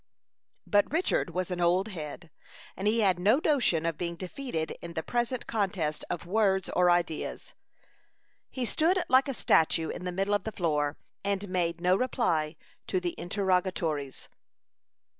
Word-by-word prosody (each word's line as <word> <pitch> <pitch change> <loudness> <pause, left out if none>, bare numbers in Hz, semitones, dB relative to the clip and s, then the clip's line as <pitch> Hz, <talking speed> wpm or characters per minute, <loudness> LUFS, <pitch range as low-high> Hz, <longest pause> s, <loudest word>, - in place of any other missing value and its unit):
But 205 0 +2
Richard 335 +4 +1
was 185 0 -3
an 175 -1 -2
old 180 +4 +2
head, 165 -2 -7 0.4
and 195 - -2
he 225 +2 +3
had 190 -4 +3
no 205 +8 +4
notion 240 - +2
of 165 -2 -2
being 170 -1 -2
defeated 180 -2 -4
in 170 0 -7
the 160 -1 -3
present 240 +3 -1
contest 190 -8 -1
of 170 - -3
words 190 0 +2
or 180 0 +3
ideas. 175 -2 -1 1.0
He 255 -2 -3
stood 345 +8 +2
like 260 +2 +5
a 275 - -1
statue 160 -4 +3
in - - -5
the 180 - -2
middle 195 +3 0
of 205 -2 +1
the 220 - -4
floor, 150 -4 0 0.3
and 200 0 -1
made 170 -2 0
no 180 +1 +3
reply 180 - 0 0.3
to 185 - 0
the 175 -1 -3
interrogatories. 180 -7 -1
185 Hz, 160 wpm, -29 LUFS, 170-210 Hz, 1.0 s, like